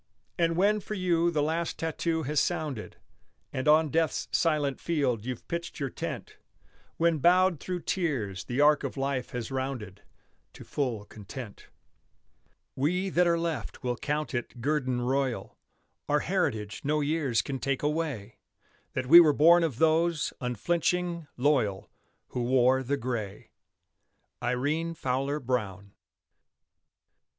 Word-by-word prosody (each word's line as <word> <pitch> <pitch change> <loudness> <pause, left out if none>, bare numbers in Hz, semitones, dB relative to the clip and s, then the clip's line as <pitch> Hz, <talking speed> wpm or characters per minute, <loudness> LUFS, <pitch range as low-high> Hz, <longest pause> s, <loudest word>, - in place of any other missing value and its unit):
And 165 -1 +2
when 205 +3 +3
for 215 +1 -6
you 175 -3 +2
the 155 -3 0
last 165 +2 -1
tattoo 160 0 -1
has 150 +2 +1
sounded, 150 -10 -2 0.6
And 130 +1 -2
on 155 +1 +5
death's 160 +1 0
silent 150 -4 +1
field 135 -10 0
you've 125 -2 -5
pitched 170 -1 -4
your 135 -3 -2
tent, - - -6 0.6
When, 165 -1 +2
bowed 180 +1 +4
through 180 +2 -4
tears, 125 - -2
the 125 +2 -3
arc 150 0 +5
of - - -4
life 135 -2 -2
has 120 +1 -5
rounded 130 -7 -4 0.5
To - - -11
full 120 -8 -2
content, 110 +2 -10 1.1
We 180 +8 0
that 180 +1 +3
are 170 0 +3
left 165 -6 -4
will 125 -1 0
count 150 +3 -2
it 120 0 -4
guerdon 130 -2 0
royal, 130 0 -1 0.5
Our - - +3
heritage 105 -1 -1
no 150 +1 +1
years 145 -5 +1
can 135 -1 -4
take 140 0 -1
away, 145 -9 -2 0.5
That 130 - -2
we 170 +7 +10
were 155 -4 +6
born 170 +4 +6
of 150 -8 -1
those, 160 0 +2
unflinching, 170 - -1
loyal, 125 -8 +1 0.4
Who 125 - -3
wore 130 +1 +3
the 140 +2 -1
gray. 115 -6 -5 0.9
IRENE 155 +6 -1
FOWLER 135 0 -1
BROWN. 105 -7 -3
145 Hz, 135 wpm, -28 LUFS, 125-165 Hz, 1.1 s, we